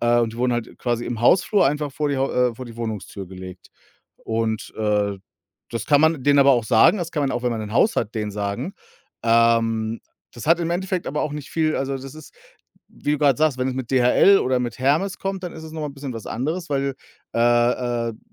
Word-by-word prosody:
äh, 120 0 +3
und 115 -2 0
die - - -10
wurden 125 +1 +1
halt 120 -1 -4
quasi 120 -1 -1
im 120 -2 -4
Hausflur 180 - +4
einfach 150 +1 -1
vor 150 +2 -1
die 140 - -1
Hau 135 +1 0
äh, 125 -1 +2
vor 130 - -8
die 115 -1 -11
Wohnungstür 110 -4 -5
gelegt. 90 0 -10 0.6
Und, 110 -1 -2
äh, 105 -2 0 0.6
das 115 -2 -3
kann 145 -1 +4
man 160 -3 +2
denen 145 0 +5
aber 140 0 +6
auch 120 -4 +3
sagen 110 - +5
das 170 -2 -4
kann 150 - -1
man 135 - 0
auch, 120 - -3
wenn 125 - +1
man 115 - -3
'n 105 - -7
Haus 215 - +3
hat, 105 - -1
denen 105 -2 -3
sagen 105 - -3 0.5
ähm, 115 -1 +2 0.3
das 120 - -9
hat 165 +2 +5
im 170 0 -1
Endeffekt 180 +1 -2
aber 150 - -1
auch 150 - -2
nicht 150 -1 -7
viel 155 -1 0
also 135 0 -2
das 135 +1 -9
ist, 155 - -13 0.5
wie 145 - -3
du 150 - 0
grad 140 -4 +3
sagst, 155 -4 +2
wenn 130 +1 0
es 130 - -3
mit 130 -2 -5
DHL 130 +10 +5
oder 130 0 +1
mit 120 -1 -4
Hermes 155 +9 +1
kommt, 195 -1 -4
dann 175 - -5
ist 160 - -10
es 160 - -9
noch 160 - -6
mal - - -2
'n 140 - -10
bisschen 140 -2 -6
was 115 -2 -8
anderes, 160 +9 -3
weil, 140 -1 0 0.4
äh, - - -1 0.7
äh, - - -4
d - - -19
130 Hz, 240 wpm, -22 LUFS, 115-150 Hz, 0.7 s, aber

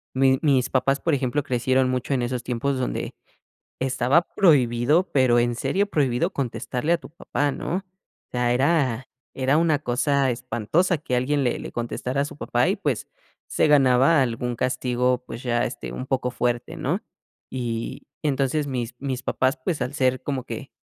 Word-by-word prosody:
mi 130 0 +4
mis 135 -5 +2
papás, 135 +1 +2
por 165 - 0
ejemplo, 140 +1 0
crecieron 130 0 +1
mucho 130 +2 -1
en 125 - 0
esos 125 0 -2
tiempos 130 +3 -1
donde 125 - -3 0.7
estaba 135 +5 +3
prohibido, 145 -1 +3
pero 125 -3 +4
en 120 0 0
serio 200 - 0
prohibido, 130 -5 +1
contestarle 130 +3 -2
a 170 - +3
tu - - -13
papá, 145 -2 -1
¿no? 150 +5 -2
O - - -8 0.5
sea, 120 -1 +1
era 130 -2 +1 0.3
era 135 +2 +2
una 160 -2 +2
cosa 135 +1 +1
espantosa 150 - 0
que 130 -4 -2
alguien 140 +3 +1
le 125 -2 0
le - - -7
contestara 125 +3 -2
a - - +2
su 145 - -8
papá - - +1
y, - - +1
pues - - -2 0.4
se - - +2
ganaba 135 +1 +5
algún 120 0 -2
castigo, 125 0 0
pues 115 - -7
ya, 120 -1 +1
este, 120 - -5
un 130 - -5
poco 130 -2 -1
fuerte, 120 -1 -1
¿no? - - -1 0.5
Y 120 -3 -4 0.2
entonces, 145 0 0
mis 125 -3 -3
mis 130 -2 -3
papás, 130 +3 +1
pues, 165 -6 -1
al 125 +2 -3
ser 130 -2 +1
como 130 -2 -3
que 120 +2 -7
130 Hz, 175 wpm, -24 LUFS, 125-145 Hz, 0.7 s, ganaba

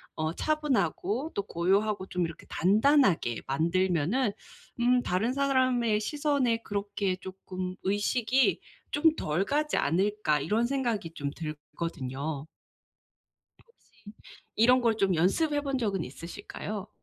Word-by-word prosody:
어 155 +1 -1
차분하고 265 - 0
또 200 - -1
고요하고 195 +3 0
좀 180 -2 -1
이렇게 165 -1 -9
단단하게 200 - +3
만들면은 180 - +1 0.5
음 245 +1 +3
'다른 195 +7 0
사람의 255 -5 +2
시선에 280 0 +1
그렇게 200 -2 -2
쪼끔 185 -1 -6
의식이 215 +6 +2 0.3
좀 315 +2 +3
덜 165 - -1
가지 300 +4 0
않을까.' 185 0 +1
이런 220 +9 +1
생각이 235 -9 -1
좀 145 -3 -3
들거든요. 150 -2 -5 1.2
혹시 465 - -30 0.5
이런 250 +4 +5
걸 230 -2 +2
좀 195 -3 +2
연습해본 280 - +1
적은 200 -8 -1
있으실까요? 200 +7 -7
205 Hz, 255 characters per minute, -29 LUFS, 175-255 Hz, 1.2 s, 이런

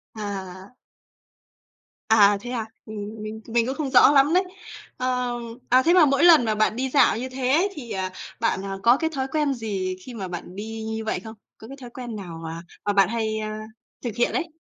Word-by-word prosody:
À. 195 0 -6 1.3
À, 205 -2 +6
thế 245 - -7
à? 230 -3 -2 0.2
Mình 215 0 -7
mình 220 +1 -6
mình 230 0 +1
cũng 265 - -3
không 290 -3 -2
rõ 260 +1 +7
lắm 285 +2 +4
đấy. 370 +1 +4 0.5
Ờ, 250 -1 -1 0.4
à, 255 +1 +5
thế 340 +4 +4
mà 350 -4 +7
mỗi 275 +3 +2
lần 320 -8 +7
mà 215 -1 0
bạn 215 +1 +2
đi 265 +2 -2
dạo 260 -4 +4
như 260 +2 -4
thế 255 -1 -3
ấy 335 +8 +3
thì, 240 -7 -9
à, 190 -2 -2 0.3
bạn, 215 -4 0
à, 195 0 -4
có 240 +2 +6
cái 320 +1 -1
thói 265 0 -1
quen 300 -3 +1
gì 195 -6 -3
khi 250 - -8
mà 195 -5 -5
bạn 180 +1 -7
đi 220 +2 -6
như 220 0 -4
vậy 220 - -1
không? 220 0 -10 0.2
Có 220 - -12
cái 275 +2 -10
thói 245 - -8
quen 240 -2 -7
nào 175 -5 -7
mà 165 +1 -6 0.2
mà 205 - +1
bạn 195 -1 +4
hay, 220 -2 -1
a, 215 0 -4 0.4
thực 235 -3 -4
hiện 240 - +1
ấy? 335 -2 -2
225 Hz, 220 wpm, -24 LUFS, 205-260 Hz, 1.3 s, rõ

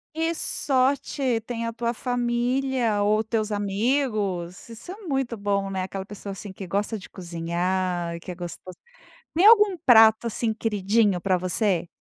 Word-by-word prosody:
Que 325 +1 0
sorte 265 -4 0
tem 230 0 -4
a 230 - -4
tua 235 0 -2
família 245 -2 0
ou 210 +1 +3
os 220 - -2
teus 220 -2 -1
amigos! 205 -4 -1
Isso 235 +9 -10
é - - -7
muito 270 - -2
bom, 200 -1 -1
né. 190 -1 -2
Aquela 190 +1 -5
pessoa, 200 0 -8
assim, 195 +1 -8
que 190 0 -8
gosta 205 +5 -2
de 190 - -11
cozinhar, 175 0 -2
que 180 - -8
é - - -7
gostos 175 +1 -8 0.6
tem 350 +5 +4
algum 420 -3 +7
prato, 225 -5 +6
assim, 225 0 -1
queridinho 210 -2 +1
pra 185 +1 +1
você? 180 0 0
215 Hz, 160 wpm, -25 LUFS, 190-245 Hz, 0.6 s, algum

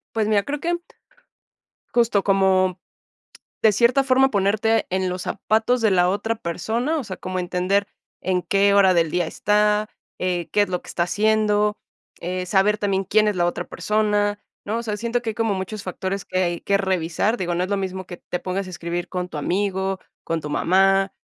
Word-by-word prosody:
Pues 220 -1 +1
mira, 205 -2 +2
creo 290 0 -4
que 345 +2 -1 1.2
justo 230 -4 +3
como 190 -2 +2 0.8
de 220 - +6
cierta 240 +6 +3
forma 265 0 +4
ponerte 215 +2 +1
en 185 0 0
los 180 0 -4
zapatos 220 +4 0
de 220 -2 +3
la 180 -1 +3
otra 225 +4 -1
persona, 230 - -2
o 280 - -4
sea, 190 -3 -6
como 185 0 -4
entender 180 +3 0 0.3
en 180 -1 0
qué 200 +3 +3
hora 195 -2 +6
del 165 -2 +2
día 175 0 0
está 210 +4 +1 0.3
eh, 180 -2 -2
qué 210 - +3
es 205 - -1
lo 180 -1 -3
que - - -15
está 170 - 0
haciendo 210 +1 +2 0.4
eh, 180 +1 -3
saber 195 +3 +3
también 195 -2 0
quién 215 +3 +3
es 205 - -1
la 175 -1 +2
otra 175 - -2
persona, 210 -1 0 0.3
¿no? 215 +2 -1
O - - -3
sea, 210 -3 -3
siento 235 +2 -1
que 225 - -2
hay - - -7
como 225 -2 0
muchos 195 +2 -5
factores 190 +1 -4
que 185 - -2
hay 175 -1 -1
que 200 - +1
revisar, 190 +3 0
digo, 175 -1 -1
no 175 +1 0
es 185 - -6
lo 200 - +1
mismo 190 -1 -4
que 175 - -9
te 180 - -5
pongas 185 +2 -3
a - - -8
escribir 175 0 -4
con 180 -1 -3
tu 150 - -5
amigo, 190 +3 -1 0.2
con 165 -1 -3
tu 150 - -5
mamá, 195 +4 +3
195 Hz, 200 wpm, -22 LUFS, 185-215 Hz, 1.2 s, de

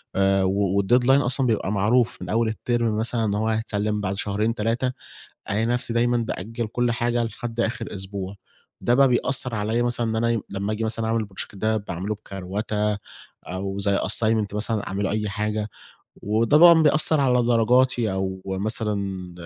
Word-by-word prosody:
آآ 95 0 +3
و 100 +1 +1
والdeadline 120 +5 +3
أصلًا 130 0 +1
بيبقى 110 -3 0
معروف 110 +2 +1
من 90 - -6
أول 115 +3 +1
الترم 115 -1 -1
مثلًا 115 +1 0
إن 100 - 0
هو 110 +2 0
هيتسلم 105 -1 -1
بعد 100 -1 -2
شهرين 105 +3 -1
3، 115 +4 0 0.6
ألاقي 105 +3 +1
نفسي 120 0 0
دايمًا 120 +1 +2
بأجّل 115 0 -3
كل 120 +2 0
حاجة 120 0 0
لحد 115 +1 -5
آخر 115 -1 -2
أسبوع، 95 0 -6 0.5
ده 120 - +2
بقى 135 +1 +5
بيأثر 125 0 0
عليّا 110 +2 0
مثلًا 120 -1 -1
إن 110 - -1
أنا 115 -2 +1
لمّا 100 +2 -3
آجي 110 +1 -2
مثلًا 110 0 -1
أعمل 115 -1 0
الproject 95 -1 -7
ده 110 +2 0
باعمله 100 0 -4
بكروَتة 105 +1 -3 0.5
أو 95 +2 -4
زي 100 0 +1
assignment 110 -2 +1
مثلًا 105 0 -1
أعمله 100 +1 -2
أي 105 0 -1
حاجة، 105 +1 -2 0.5
وطبعًا 150 - +5
بيأثر 155 0 +4
على 125 -2 +3
درجاتي 120 -1 +2
أو 95 0 -3
مثلًا 100 -2 -3
110 Hz, 165 wpm, -24 LUFS, 100-120 Hz, 0.6 s, بقى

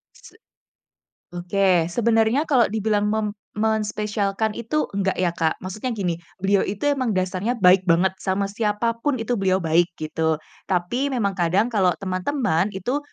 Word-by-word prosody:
Se - - -17 1.0
oke 175 -1 +1
sebenarnya 230 - +2
kalau 255 -7 +4
dibilang 210 -1 0
mem 215 0 0 0.3
menspesialkan 210 -1 -1
itu 235 +7 -1
enggak 195 -1 0
ya 180 -2 +2
Kak 160 -2 0
maksudnya 205 +7 -4
gini 185 -5 -1 0.3
beliau 195 0 +3
itu 200 +1 -5
emang 260 -4 0
dasarnya 185 +5 -1
baik 185 -1 +6
banget 180 +3 +3
sama 195 +1 -1
siapa 225 +2 -1
pun 290 - +1
itu 240 +2 -1
beliau 190 -1 +2
baik 170 +2 +2
gitu 160 0 -1 0.3
tapi 190 +9 0
memang 205 -7 0
kadang 180 +6 +2
kalau 195 -5 +3
teman-teman 190 - 0
itu, 245 +9 -1
200 Hz, 145 wpm, -23 LUFS, 185-225 Hz, 1.0 s, baik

